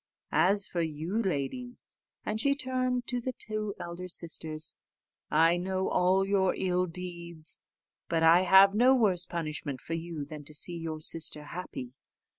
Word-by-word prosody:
As 200 Hz, +2 st, +3 dB
for 175 Hz, -, -2 dB
you, 165 Hz, +7 st, -2 dB
ladies," 205 Hz, -, -4 dB, 0.3 s
and 215 Hz, +1 st, -1 dB
she 280 Hz, +2 st, +2 dB
turned 255 Hz, -2 st, -1 dB
to 245 Hz, -1 st, -2 dB
the 255 Hz, +2 st, -3 dB
two 215 Hz, -3 st, -2 dB
elder 175 Hz, +1 st, -6 dB
sisters, 160 Hz, -3 st, -1 dB, 0.6 s
"I 165 Hz, +2 st, +4 dB
know 190 Hz, +1 st, -1 dB
all 185 Hz, +2 st, +3 dB
your 195 Hz, -1 st, +2 dB
ill 180 Hz, -1 st, +1 dB
deeds, 170 Hz, -2 st, -4 dB, 0.5 s
but 165 Hz, -1 st, +1 dB
I 165 Hz, +2 st, +7 dB
have 190 Hz, +2 st, +7 dB
no 250 Hz, +5 st, +5 dB
worse 185 Hz, -8 st, +2 dB
punishment 155 Hz, -5 st, -4 dB
for 165 Hz, -, -6 dB
you 165 Hz, -3 st, -4 dB
than 150 Hz, 0 st, -9 dB
to 155 Hz, -, -6 dB
see 170 Hz, +3 st, +1 dB
your 160 Hz, -2 st, -5 dB
sister 155 Hz, -1 st, +1 dB
happy. 145 Hz, -6 st, -7 dB
180 Hz, 155 wpm, -29 LUFS, 165-200 Hz, 0.6 s, I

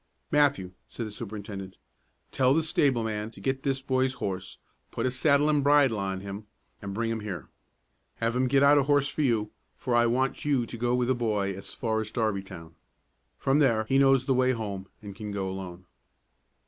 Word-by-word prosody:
"Matthew," 140 Hz, -11 st, +2 dB, 0.2 s
said 115 Hz, -, -5 dB
the 110 Hz, -, -7 dB
superintendent, 100 Hz, -3 st, -7 dB, 0.5 s
"tell 130 Hz, 0 st, +3 dB
the 160 Hz, -, +2 dB
stable 140 Hz, -6 st, +2 dB
man 110 Hz, -1 st, -3 dB
to 115 Hz, -, -15 dB
get 135 Hz, 0 st, -1 dB
this 135 Hz, -1 st, -1 dB
boy's 130 Hz, 0 st, +1 dB
horse, 95 Hz, -4 st, -4 dB, 0.3 s
put -, -, -3 dB
a 130 Hz, -, +1 dB
saddle 140 Hz, +3 st, +3 dB
and 150 Hz, -2 st, +2 dB
bridle 140 Hz, -6 st, +4 dB
on 95 Hz, -1 st, -3 dB
him, 100 Hz, +2 st, -7 dB, 0.3 s
and 100 Hz, -, -5 dB
bring 115 Hz, +1 st, -1 dB
him 115 Hz, -, -2 dB
here. 95 Hz, -7 st, -6 dB, 0.7 s
Have 115 Hz, +1 st, -1 dB
him 130 Hz, +1 st, +2 dB
get 135 Hz, +2 st, +3 dB
out 145 Hz, +1 st, +6 dB
a -, -, +2 dB
horse 145 Hz, -1 st, +3 dB
for 155 Hz, -, -3 dB
you, 110 Hz, -6 st, +1 dB, 0.2 s
for 125 Hz, -, -3 dB
I 120 Hz, 0 st, +4 dB
want 130 Hz, +3 st, 0 dB
you 140 Hz, -5 st, +1 dB
to 120 Hz, -, -8 dB
go 120 Hz, +1 st, 0 dB
with 125 Hz, -1 st, +1 dB
the 130 Hz, -, +3 dB
boy 105 Hz, -5 st, -1 dB
as 95 Hz, -, -8 dB
far 110 Hz, -2 st, -1 dB
as 110 Hz, -, -5 dB
Darbytown. 95 Hz, -8 st, -3 dB, 0.6 s
From 135 Hz, +2 st, +2 dB
there 115 Hz, -7 st, +3 dB
he 135 Hz, +3 st, +3 dB
knows 135 Hz, -1 st, +4 dB
the 135 Hz, -, +2 dB
way 130 Hz, 0 st, +3 dB
home, 100 Hz, -5 st, -5 dB, 0.2 s
and 100 Hz, -2 st, -8 dB
can 105 Hz, 0 st, -6 dB
go 100 Hz, -1 st, -2 dB
alone." 95 Hz, -1 st, -7 dB
115 Hz, 200 wpm, -27 LUFS, 100-135 Hz, 0.7 s, out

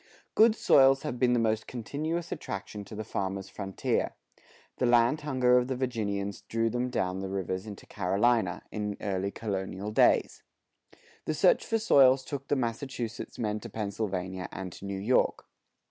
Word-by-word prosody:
Good 220 Hz, 0 st, +6 dB
soils 135 Hz, -8 st, +5 dB
have 135 Hz, -5 st, -4 dB
been 125 Hz, 0 st, +3 dB
the 120 Hz, -, +3 dB
most 110 Hz, -1 st, 0 dB
continuous 155 Hz, +8 st, -4 dB
attraction 100 Hz, +1 st, -5 dB
to 110 Hz, -, -9 dB
the 110 Hz, -, -4 dB
farmer's 95 Hz, -1 st, -3 dB
frontier. 95 Hz, -1 st, -2 dB, 0.6 s
The 125 Hz, -, +1 dB
land 120 Hz, +5 st, +4 dB
hunger 130 Hz, -4 st, +3 dB
of 125 Hz, -, -2 dB
the 130 Hz, -, -2 dB
Virginians 105 Hz, -6 st, -2 dB
drew 115 Hz, 0 st, -1 dB
them 125 Hz, +2 st, -1 dB
down 95 Hz, -6 st, -1 dB
the 95 Hz, 0 st, -4 dB
rivers 95 Hz, +1 st, -3 dB
into 100 Hz, -2 st, -9 dB
Carolina, 100 Hz, 0 st, +1 dB
in 105 Hz, -1 st, -3 dB
early 100 Hz, -1 st, -1 dB
colonial 100 Hz, -1 st, -4 dB
days; -, -, +3 dB, 0.8 s
the 155 Hz, -, -1 dB
search 180 Hz, +4 st, +4 dB
for 225 Hz, -, 0 dB
soils 135 Hz, -, +5 dB
took 140 Hz, -2 st, -5 dB
the -, -, +2 dB
Massachusetts 120 Hz, -2 st, -4 dB
men 105 Hz, -2 st, -1 dB
to 115 Hz, -, -9 dB
Pennsylvania 95 Hz, -4 st, -3 dB
and 95 Hz, -2 st, -6 dB
to 95 Hz, -, -10 dB
New 100 Hz, -1 st, -4 dB
York. 115 Hz, +6 st, +1 dB
110 Hz, 160 wpm, -29 LUFS, 100-130 Hz, 0.8 s, Good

